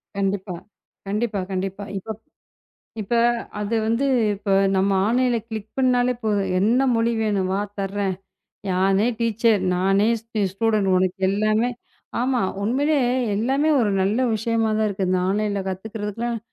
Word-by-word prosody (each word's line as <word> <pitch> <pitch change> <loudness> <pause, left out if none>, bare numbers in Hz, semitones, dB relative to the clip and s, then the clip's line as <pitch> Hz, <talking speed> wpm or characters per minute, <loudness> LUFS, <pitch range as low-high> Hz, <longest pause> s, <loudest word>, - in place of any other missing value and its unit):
கண்டிப்பா. 195 -1 -2 0.5
கண்டிப்பா. 210 +1 -1
கண்டிப்பா. 195 +1 -3
இப்ப 220 +3 -6 0.9
இப்ப 205 +4 -2 0.5
அது 210 +2 -2
வந்து. 230 +5 +1 0.3
இப்ப 200 0 -5 0.3
நம்ம 195 +1 +2
ஆன்லைன்ல 245 +1 +2
கிளிக் 220 -2 -6
பண்ணாலே 250 -1 +3
போதும். 200 -3 0
என்ன 230 +6 +3
மொழி 230 +1 +1
வேணும்வா? 195 -2 0 0.2
தரேன். 195 0 -1 0.6
நானே 195 +3 +2
டீச்சர். 230 -2 +2
நானே 195 +4 +2
ஸ் 225 - -31 0.3
ஸ்டூடண்ட். 215 -1 +1
உனக்கு 185 +1 0
எல்லாமே. 215 +4 +1 0.5
ஆமா. 255 0 +1 0.2
உண்மையிலேயே 270 +3 +1 0.3
எல்லாமே 270 +8 +1
ஒரு 215 -3 +1
நல்ல 200 +5 +1 0.2
விஷயமா 225 0 0
தான் 220 - +2
இருக்கு. 195 -1 -2
நான் 180 0 +1
ஆன்லைன்ல 205 -1 -1
கத்துக்கிறதுக்குலாம் 220 +4 -4
210 Hz, 125 wpm, -22 LUFS, 195-230 Hz, 0.9 s, பண்ணாலே